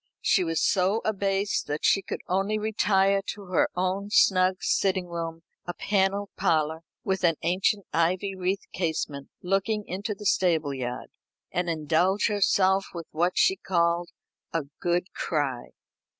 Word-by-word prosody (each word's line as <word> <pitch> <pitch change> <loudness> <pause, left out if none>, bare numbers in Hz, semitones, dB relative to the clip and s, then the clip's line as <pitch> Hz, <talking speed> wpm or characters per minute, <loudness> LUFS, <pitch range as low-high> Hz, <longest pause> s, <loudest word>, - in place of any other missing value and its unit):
She 185 - +3
was 165 -2 -1
so 195 +4 +2
abased 200 -1 0
that 150 +1 -2
she 195 - +4
could - - -6
only 195 +4 0
retire 200 -2 +2
to 205 -1 -11
her 180 - +3
own 185 +3 -1
snug 185 -2 +4
sitting 190 -2 +1
room, 165 -1 -5 0.2
a 175 - -4
panelled 200 0 0
parlour, 160 -4 +1 0.2
with 190 -1 -1
an 165 -2 +4
ancient 190 +3 +1
ivy 180 +5 +1
wreathed 185 +1 -2
casement 155 -5 -3
looking 195 +3 0
into 200 +3 -4
the 210 - -10
stable 165 -7 +2
yard, 125 -1 -5 0.4
and 175 -1 -1
indulge 165 +6 +1
herself 195 -1 +2
with 170 -1 -5
what 175 +3 0
she 380 - +4
called 170 - 0 0.4
"a 165 -2 -1 0.2
good 175 +1 -1
cry." 140 -6 -2
185 Hz, 145 wpm, -26 LUFS, 170-195 Hz, 0.4 s, she